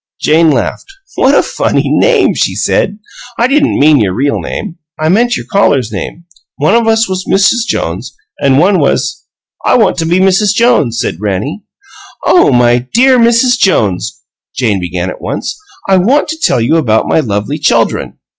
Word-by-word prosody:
Jane 160 +1 +2
laughed. 145 - -2 0.3
"What 275 +2 +2
a - - +3
funny - - -1
name!" 475 -5 +2
she - - -1
said. 200 +1 -1 0.4
"I 235 - +2
didn't 290 +3 +1
mean 150 0 +4
your 95 -4 -1
real 140 +5 -1
name; 175 -6 -6 0.2
I 155 0 0
meant 240 +6 +1
your - - -8
callers' 140 - +1
name. 170 - -6 0.3
One 150 +1 0
of 230 -1 +2
us 225 0 +2
was 185 0 -4
Mrs. 220 +5 +2
Jones, 95 +10 -3 0.3
and 135 -2 +2
one 185 +5 +3
was 145 - -1 0.2
" - - -35
"I - - +3
want - - +1
to 165 - -1
be 175 +2 +1
Mrs. 195 +2 +2
Jones," 225 - +1
said 95 - -4
Rannie. 105 - -3 0.6
"Oh, 355 - +4
my 120 0 +2
DEAR 255 +1 +4
Mrs. 235 +2 +2
Jones," 105 - 0 0.4
Jane 110 -6 0
began 90 +1 -4
at - - -11
once, - - -4 0.3
"I 190 -1 +3
want 255 +13 +1
to 320 +1 -5
tell 130 - +1
you 120 +8 +1
about 110 -8 +1
my - - +1
lovely 105 -7 -3
chuldren. - - 0
165 Hz, 180 wpm, -11 LUFS, -, 0.6 s, mean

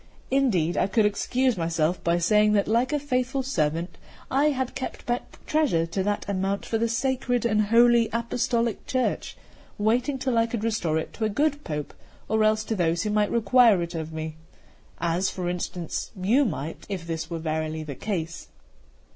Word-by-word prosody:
Indeed, 200 - +2
I - - +2
could 215 +2 +2
excuse 250 +4 +1
myself 165 +1 0
by 170 0 +2
saying 210 +4 +3
that, 200 -1 +2
like 235 +5 +2
a 300 - +2
faithful 265 -1 -1
servant, 165 - -1 0.3
I 275 +3 +3
had 260 -4 0
kept 265 - -6
back 240 0 -3
treasure 280 - +2
to 170 +4 -2
that 205 +2 -1
amount 195 0 -1
for 225 - -1
the 230 0 +1
sacred 245 0 0
and 215 -2 +2
Holy 235 +1 +5
Apostolic 235 0 -1
Church, 255 -1 -1 0.4
waiting 240 +6 +1
till 255 -3 +1
I 230 - +3
could 230 -2 -4
restore 195 -9 0
it 160 - -4
to 220 - -2
a - - +1
good 290 +6 0
Pope, 150 -2 -4 0.3
or 220 0 +2
else 215 0 +3
to 220 - -2
those 170 -2 +1
who 210 - -1
might 210 0 +2
require 230 -4 +4
it 170 - -6
of 160 -1 -4
me; 160 0 -5 0.6
as, 170 +3 +1
for 180 -2 -4
instance, 175 -1 -3
you 235 +10 +3
might, 160 - -4
if 185 -4 -4
this 165 -1 -4
were 170 - -3
verily 155 0 -2
the 150 -2 -6
case." 170 0 -4
210 Hz, 180 wpm, -26 LUFS, 170-240 Hz, 0.6 s, Holy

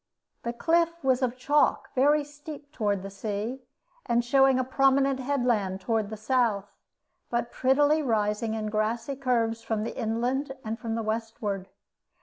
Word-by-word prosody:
The 235 - -2
cliff 335 +5 +1
was 260 -1 +2
of 255 -1 0
chalk, 290 +4 +2
very 290 +3 +4
steep 290 0 -10
toward 205 -7 -1
the 195 - -6
sea, 215 +5 -4 0.5
and 235 0 +2
showing 270 +1 +5
a 255 - +2
prominent 270 +1 +3
headland 245 -8 0
toward 220 +1 -1
the 220 - -6
south, 220 -3 0 0.6
but 235 0 -1
prettily 290 +4 +3
rising 220 -3 0
in 215 -1 -3
grassy 230 +5 -1
curves 235 -4 0
from 220 -2 -2
the 225 - -4
inland 250 +4 -1
and 220 +2 -3
from 225 -2 -3
the 230 - -2
westward. 215 -3 -3
240 Hz, 150 wpm, -27 LUFS, 220-270 Hz, 0.6 s, showing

